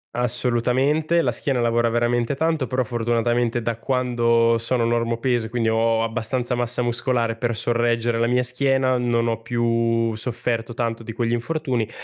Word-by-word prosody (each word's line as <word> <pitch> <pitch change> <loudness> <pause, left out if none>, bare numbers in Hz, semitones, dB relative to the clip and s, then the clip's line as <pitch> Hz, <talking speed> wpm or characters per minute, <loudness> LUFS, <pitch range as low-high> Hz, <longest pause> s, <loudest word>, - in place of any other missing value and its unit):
Assolutamente. 125 +7 +1
La 120 - +1
schiena 125 +2 -2
lavora 120 0 +2
veramente 120 +2 0
tanto, 160 -3 0
però 125 +2 0
fortunatamente 120 0 0
da 115 -1 -2
quando 115 -2 +2
sono 115 0 0
normopeso, 115 0 0
quindi 115 -1 0
ho 115 0 +2
abbastanza 120 +2 -2
massa 120 0 -1
muscolare 120 -1 0
per 120 0 -2
sorreggere 120 0 +1
la 115 - +2
mia 125 +1 +2
schiena 130 0 +1
non 120 -1 +1
ho 115 -1 -2
più 115 -1 0
sofferto 115 0 -3
tanto 115 -1 -2
di 115 0 -7
quegli 115 0 -1
infortuni. 125 -2 -1
120 Hz, 150 wpm, -22 LUFS, 115-125 Hz, -, lavora